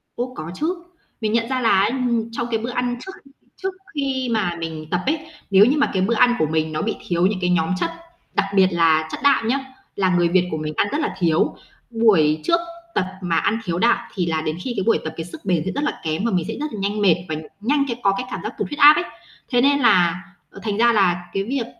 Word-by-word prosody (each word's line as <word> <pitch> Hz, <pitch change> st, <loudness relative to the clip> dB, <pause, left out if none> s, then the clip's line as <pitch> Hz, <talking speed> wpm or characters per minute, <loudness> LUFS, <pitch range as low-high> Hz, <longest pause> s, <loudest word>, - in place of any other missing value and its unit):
Ô, 250 Hz, +1 st, -4 dB
có 160 Hz, -2 st, -6 dB
chứ. 345 Hz, -, -2 dB, 0.4 s
Mình 215 Hz, -1 st, -1 dB
nhận 230 Hz, +1 st, +1 dB
ra 260 Hz, -1 st, -1 dB
là 230 Hz, -, +3 dB
á, 200 Hz, -, +3 dB
ừm, 240 Hz, -3 st, -1 dB
trong, 235 Hz, +1 st, -3 dB
cái, 225 Hz, -, +2 dB
bữa 230 Hz, +2 st, -4 dB
ăn 245 Hz, 0 st, -2 dB
trước 380 Hz, -, -7 dB, 0.5 s
trước 380 Hz, 0 st, -2 dB, 0.2 s
khi 265 Hz, -3 st, -1 dB
mà 205 Hz, -6 st, 0 dB
mình 160 Hz, -1 st, -6 dB
tập 175 Hz, -, +1 dB
ấy, 305 Hz, +4 st, +1 dB, 0.3 s
nếu 195 Hz, +2 st, +7 dB
như 275 Hz, +5 st, +2 dB
mà 285 Hz, -, +2 dB
cái 190 Hz, -, +1 dB
bữa 230 Hz, -, +1 dB
ăn 245 Hz, +2 st, +4 dB
của 155 Hz, -, +3 dB
mình 160 Hz, 0 st, -1 dB
nó 155 Hz, 0 st, -2 dB
bị 220 Hz, -, -1 dB
thiếu 175 Hz, -1 st, +1 dB
những 195 Hz, 0 st, +1 dB
cái 180 Hz, -, +1 dB
nhóm 165 Hz, -2 st, +1 dB
chất, 335 Hz, -, -1 dB, 0.4 s
đặc 200 Hz, -, +1 dB
biệt 190 Hz, -1 st, +6 dB
là 160 Hz, -2 st, +3 dB
chất -, -, -5 dB
đạm 275 Hz, -5 st, +3 dB
nhá, 270 Hz, +4 st, +1 dB, 0.4 s
là 190 Hz, -2 st, +1 dB
người 175 Hz, -1 st, +3 dB
Việt 180 Hz, 0 st, +2 dB
của 155 Hz, -, -2 dB
mình 155 Hz, 0 st, -4 dB
ăn -, -, +2 dB
rất 295 Hz, -, -1 dB
là -, -, -2 dB
thiếu, 165 Hz, -3 st, +2 dB, 0.3 s
buổi 195 Hz, -10 st, +3 dB
trước 335 Hz, -, +3 dB, 0.4 s
tập -, -, +2 dB, 0.2 s
mà 175 Hz, -2 st, -1 dB
ăn 225 Hz, +6 st, +1 dB
thiếu 170 Hz, -5 st, -2 dB
đạm, 235 Hz, -, +4 dB, 0.2 s
thì 180 Hz, -3 st, -1 dB
là 160 Hz, -2 st, -1 dB
đến 155 Hz, +1 st, -3 dB
khi 250 Hz, -, -3 dB
cái 195 Hz, -, 0 dB
buổi 230 Hz, -, +3 dB
tập -, -, -5 dB
cái 165 Hz, -, -4 dB
sức 175 Hz, -, -11 dB
bền 175 Hz, -5 st, +1 dB
sẽ 190 Hz, -, -1 dB
rất 285 Hz, -, -3 dB
là 295 Hz, -, -2 dB
kém, 160 Hz, +6 st, -2 dB
và 235 Hz, -, +1 dB
mình 180 Hz, -3 st, 0 dB
sẽ -, -, -3 dB
rất 300 Hz, -3 st, -4 dB
là 210 Hz, -, -5 dB
nhanh 205 Hz, +2 st, -1 dB
mệt 180 Hz, -5 st, +5 dB
và 155 Hz, -, -1 dB, 0.3 s
nhanh 280 Hz, +5 st, +1 dB
cái 235 Hz, -1 st, -4 dB
có 195 Hz, -, +4 dB
cái 250 Hz, -, -3 dB
cảm -, -, -4 dB
giác -, -, -4 dB
tụt -, -, -2 dB
huyết 295 Hz, +1 st, -7 dB
áp 295 Hz, +1 st, +9 dB
ấy. 360 Hz, -, 0 dB, 0.4 s
Thế 245 Hz, -2 st, +3 dB
nên 280 Hz, +2 st, +4 dB
là, 180 Hz, -7 st, +3 dB, 0.3 s
ờ, -, -, -13 dB
thành 210 Hz, -2 st, -2 dB
ra 235 Hz, +1 st, +4 dB
là 175 Hz, -4 st, +2 dB
cái 195 Hz, -, 0 dB
việc 250 Hz, +2 st, -2 dB
205 Hz, 270 wpm, -21 LUFS, 175-245 Hz, 0.5 s, áp